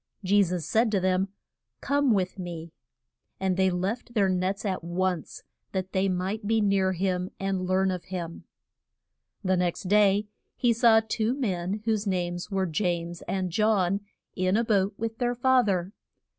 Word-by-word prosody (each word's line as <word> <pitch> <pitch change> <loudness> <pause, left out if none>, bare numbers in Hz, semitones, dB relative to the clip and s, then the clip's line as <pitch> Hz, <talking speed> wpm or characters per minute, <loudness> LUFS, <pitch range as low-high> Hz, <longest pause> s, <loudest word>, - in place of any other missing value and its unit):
Je 200 +2 +4
sus 180 -4 -1
said 225 +7 +2
to 205 -2 +1
them, 185 +1 +1 0.5
Come 285 -2 +2
with 190 -2 0
me. 170 -2 -6 0.7
And 190 -1 +1
they 190 0 +3
left 195 +7 -3
their 200 -3 +3
nets 185 +3 -1
at 190 -4 -2
once, 175 0 -2 0.3
that 190 -1 -2
they 195 0 +1
might 190 +4 -2
be 225 +1 +3
near 195 -2 +2
him 185 0 -1
and 190 -1 -1
learn 190 +1 +2
of 180 -2 -5
him. 175 -3 -6 1.0
The 185 -1 +2
next 175 -1 -1
day 205 +1 +4 0.3
he 240 -2 +2
saw 225 -1 +5
two 225 +3 0
men 200 -5 -2
whose 220 -2 0
names 175 -1 -2
were 195 -2 0
James 170 0 -2
and 185 -2 -1
John 200 -1 +2 0.4
in 185 +2 +1
a 230 - +2
boat 200 -3 +1
with 225 0 -4
their 245 -1 0
fa 260 +1 +4
ther. 190 -2 -1
190 Hz, 165 wpm, -27 LUFS, 180-215 Hz, 1.0 s, saw